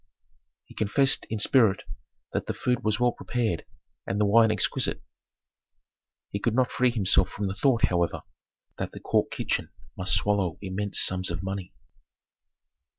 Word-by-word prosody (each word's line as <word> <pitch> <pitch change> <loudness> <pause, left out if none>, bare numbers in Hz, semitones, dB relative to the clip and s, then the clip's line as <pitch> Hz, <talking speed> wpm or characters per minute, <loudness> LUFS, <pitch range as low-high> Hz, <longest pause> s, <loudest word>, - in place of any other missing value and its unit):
He - - -16
confessed 135 +6 +2
in 110 - -2
spirit 110 -2 +3 0.5
that - - -2
the - - -3
food 125 -1 -1
was 105 -1 0
well 125 0 +3
prepared 115 -8 -2 0.4
and 100 - -2
the 105 - +3
wine 110 +2 +5
exquisite. 110 -2 +1 1.3
He 100 - -3
could 115 +2 0
not 130 -1 +2
free 125 0 +2
himself 95 -5 +2
from 100 - -4
the 95 - -2
thought, 115 +3 +2
however, 85 -1 -1 0.6
that - - -4
the - - -8
court - - 0
kitchen - - -2 0.3
must 90 0 +1
swallow 100 -5 0
immense 100 +1 -3
sums 95 0 +1
of 85 +1 -4
money. 95 -1 -5
105 Hz, 155 wpm, -26 LUFS, 95-115 Hz, 1.3 s, wine